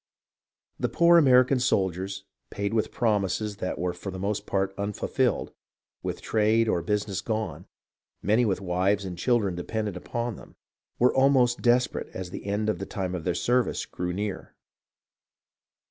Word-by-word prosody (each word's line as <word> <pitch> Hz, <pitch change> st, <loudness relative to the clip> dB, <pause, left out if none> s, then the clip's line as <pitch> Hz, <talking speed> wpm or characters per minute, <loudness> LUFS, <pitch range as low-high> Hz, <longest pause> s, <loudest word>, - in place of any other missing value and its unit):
The -, -, 0 dB
poor 170 Hz, 0 st, +6 dB
American 130 Hz, -2 st, +5 dB
soldiers, 95 Hz, -5 st, 0 dB, 0.3 s
paid 100 Hz, +1 st, -3 dB
with 110 Hz, -2 st, 0 dB
promises 105 Hz, -2 st, 0 dB
that 90 Hz, -, -3 dB
were 90 Hz, 0 st, -1 dB
for 90 Hz, +2 st, -7 dB
the 95 Hz, -, -6 dB
most 100 Hz, +2 st, -2 dB
part 95 Hz, 0 st, 0 dB
unfulfilled, 100 Hz, +1 st, -1 dB, 0.5 s
with -, -, -4 dB
trade 110 Hz, +1 st, +2 dB
or 90 Hz, -5 st, +1 dB
busi 105 Hz, +4 st, -1 dB
ness 95 Hz, -, -2 dB
gone, 100 Hz, -7 st, -3 dB, 0.5 s
many 110 Hz, +5 st, +2 dB
with 100 Hz, -3 st, 0 dB
wives 95 Hz, +2 st, +1 dB
and 90 Hz, -2 st, -5 dB
children 105 Hz, 0 st, +1 dB
dependent 105 Hz, +3 st, -3 dB
upon 120 Hz, +4 st, -4 dB
them, -, -, -14 dB, 0.4 s
were 125 Hz, +1 st, +4 dB
almost 130 Hz, -3 st, +3 dB
desperate 125 Hz, +1 st, +2 dB
as 90 Hz, -1 st, -5 dB
the 100 Hz, -, -7 dB
end 105 Hz, +2 st, -1 dB
of 105 Hz, -5 st, 0 dB
the 95 Hz, -, -5 dB
time 95 Hz, -2 st, -3 dB
of 85 Hz, -3 st, -4 dB
their 90 Hz, -, 0 dB
service 120 Hz, +6 st, +1 dB
drew 90 Hz, 0 st, -2 dB
near. 100 Hz, +2 st, -4 dB
100 Hz, 160 wpm, -27 LUFS, 95-115 Hz, 0.5 s, poor